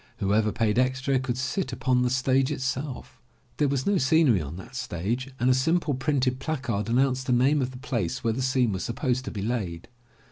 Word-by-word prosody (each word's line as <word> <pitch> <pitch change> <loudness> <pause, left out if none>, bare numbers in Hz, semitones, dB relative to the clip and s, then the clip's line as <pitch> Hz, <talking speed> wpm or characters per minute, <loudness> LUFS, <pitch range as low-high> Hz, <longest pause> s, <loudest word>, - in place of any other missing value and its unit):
Whoever 105 +2 +1
paid 110 +2 +1
extra 130 +1 +1
could 125 -1 -3
sit 130 +3 -2
upon 125 0 +1
the 125 - +2
stage 130 +2 +2
itself. 130 -1 -4 0.4
There 145 - +2
was 135 -1 -1
no 200 -2 +2
scenery 135 - +4
on 75 +2 -6
that 95 +8 -10
stage 120 +2 -3
and 125 - +1
a 130 - +6
simple 155 +4 +1
printed 130 -1 0
placard 120 -10 -2
announced 130 +1 +1
the 125 - +2
name 135 +4 +3
of 125 - -1
the 130 - -10
place 120 - -3
where 115 -1 +1
the 130 - -3
scene 130 -3 +2
was 95 -1 -3
sup 115 - -4
posed 130 -1 -1
to - - -4
be 100 -3 -4
laid. 100 -8 -3
130 Hz, 210 wpm, -26 LUFS, 115-135 Hz, 0.4 s, a